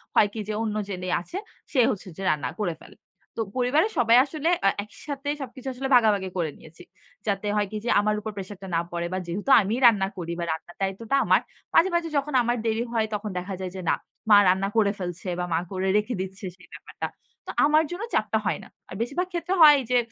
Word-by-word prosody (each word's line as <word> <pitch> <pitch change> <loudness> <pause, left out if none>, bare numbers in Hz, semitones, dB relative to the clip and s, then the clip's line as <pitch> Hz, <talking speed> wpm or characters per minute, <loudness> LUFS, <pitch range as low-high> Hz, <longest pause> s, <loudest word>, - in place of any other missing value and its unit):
হয় 205 - +6
কি 220 - -5
যে 215 - -2
অন্য 215 -1 -2
যিনি 185 -1 -4
আছে, 355 - -7 0.3
সে 265 - +1
হচ্ছে 200 -2 -6
যে - - -7
রান্না 140 -5 0
করে 175 -5 -1
ফেলে। - - -15 0.4
তো - - 0 0.2
পরিবারের 290 - +2
সবাই 235 -1 +5
আসলে 310 +2 -2 0.2
আ - - +7
একইসাথে 285 +6 -7
সবকিছু 265 0 -8
আসলে 265 +2 -3
ভাগাভাগি 205 -5 +3
করে 160 -4 -1
নিয়েছি। 160 +1 -15 0.4
যাতে 200 +1 -1
হয় 205 -1 +1
কি 215 - -3
যে - - -1
আমার 210 0 +1
উপর 215 +1 -5
প্রেশার 195 0 -6
টা 190 - -7
না 165 - +2
পড়ে 170 0 -2
বা - - 0
যেহেতু 200 +10 -4
আমিই 215 +5 -1
রান্না 200 -5 +5
করি 170 -1 -4
বা 170 - -1
রান্নার 160 +2 -6
দায়িত্বটা 200 +7 -1
আমার। - - +4 0.3
মাঝে, 355 +3 +5
মাঝে, 340 -1 +1
যখন 280 +1 -1
আমার 240 +1 0
দেরি 225 +1 +1
হয় 220 -1 +1
তখন 210 0 -4
দেখা 185 +2 -6
যায় 185 -1 -4
যে 185 - -5
না। - - +4 0.3
মা 205 - +9
রান্না 190 +2 +3
করে 205 -2 +4
ফেলছে 180 +1 -5
বা 180 - -1
মা 165 - +2
করে 190 0 -1
রেখে 210 +4 -1
দিচ্ছে 190 +1 -7
সেই 180 - -18
ব্যাপারটা। - - -6 0.4
তো - - -3
আমার 305 +2 +4
জন্য 365 +5 -4
চাপটা - - +1
হয় - - 0
না। - - -12 0.2
আর 185 - -7
বেশিরভাগ 285 +10 -1
ক্ষেত্রে 345 +2 -1
হয় 295 -2 +9
যে, 250 - +4
210 Hz, 225 wpm, -25 LUFS, 190-255 Hz, 0.4 s, মা